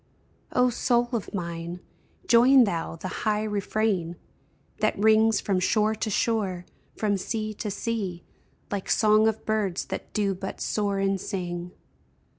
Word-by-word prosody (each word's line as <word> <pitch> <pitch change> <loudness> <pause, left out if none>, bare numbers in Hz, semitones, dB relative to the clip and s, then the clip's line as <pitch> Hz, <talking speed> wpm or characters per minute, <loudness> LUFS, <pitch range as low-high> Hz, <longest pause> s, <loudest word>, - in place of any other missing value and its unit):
O 250 0 +3
soul 240 0 +1
of 225 -4 -2
mine, 170 -1 -5 0.5
join 250 +3 +6
thou 170 -7 -2
the 165 - -6
high 210 0 +1
refrain 205 -4 -1 0.6
That - - +1
rings 220 +1 +4
from 195 -2 0
shore 215 +3 +2
to 220 0 -3
shore, 195 -5 0 0.3
from 205 -2 +1
sea 215 +2 -3
to 210 +1 -4
sea, 200 -4 -3 0.5
Like 200 -2 -3
song 215 0 +4
of 220 0 -2
birds 210 -5 -1
that - - -6
do 205 -2 0
but 190 +1 -6
soar 205 -2 -1
and 195 -1 0
sing 175 -1 -4
210 Hz, 140 wpm, -26 LUFS, 185-220 Hz, 0.6 s, join